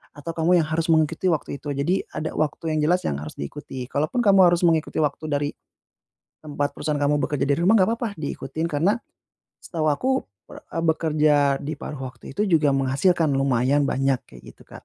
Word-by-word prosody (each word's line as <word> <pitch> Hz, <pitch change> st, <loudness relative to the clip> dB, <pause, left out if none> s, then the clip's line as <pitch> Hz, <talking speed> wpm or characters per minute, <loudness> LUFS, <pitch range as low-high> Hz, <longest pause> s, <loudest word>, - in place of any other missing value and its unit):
atau 145 Hz, +3 st, -6 dB
kamu 175 Hz, +2 st, +4 dB
yang -, -, -5 dB
harus 160 Hz, +1 st, -1 dB
mengikuti 160 Hz, +3 st, +2 dB
waktu 150 Hz, -3 st, -2 dB
itu. 145 Hz, 0 st, -6 dB
Jadi 160 Hz, +8 st, 0 dB
ada 155 Hz, -, -4 dB
waktu 155 Hz, +1 st, -1 dB
yang -, -, +1 dB
jelas 180 Hz, +4 st, +2 dB
yang 70 Hz, -, -1 dB
harus 75 Hz, +1 st, -7 dB
diikuti. 125 Hz, -, -7 dB
Kalaupun 155 Hz, -, -1 dB
kamu 195 Hz, -2 st, +5 dB
harus 175 Hz, 0 st, +2 dB
mengikuti 165 Hz, -2 st, +2 dB
waktu 150 Hz, +1 st, -1 dB
dari 145 Hz, 0 st, 0 dB, 1.0 s
tempat 145 Hz, -1 st, -3 dB
perusahaan 150 Hz, -1 st, -2 dB
kamu 145 Hz, +1 st, +2 dB
bekerja 140 Hz, +1 st, -1 dB
dari 140 Hz, -, +3 dB
rumah 195 Hz, -, +5 dB
enggak 185 Hz, -, +3 dB
papa 235 Hz, -1 st, -2 dB
diikutin 160 Hz, +2 st, -4 dB
karena 170 Hz, +9 st, +1 dB, 0.6 s
setahu 160 Hz, -3 st, -2 dB
aku, 150 Hz, -, 0 dB, 0.4 s
eee, 165 Hz, -, -6 dB
bekerja 155 Hz, -2 st, +2 dB, 0.3 s
di 155 Hz, -, -3 dB
paruh 150 Hz, -, -6 dB, 0.2 s
waktu -, -, -13 dB
itu 210 Hz, -, +2 dB
juga 155 Hz, -5 st, +3 dB
menghasilkan 145 Hz, +4 st, +2 dB
lumayan 135 Hz, +1 st, +2 dB
banyak 135 Hz, -1 st, +1 dB
kayak 60 Hz, -1 st, -14 dB
gitu -, -, -19 dB
Kak. -, -, -12 dB
150 Hz, 185 wpm, -23 LUFS, 140-165 Hz, 1.0 s, kamu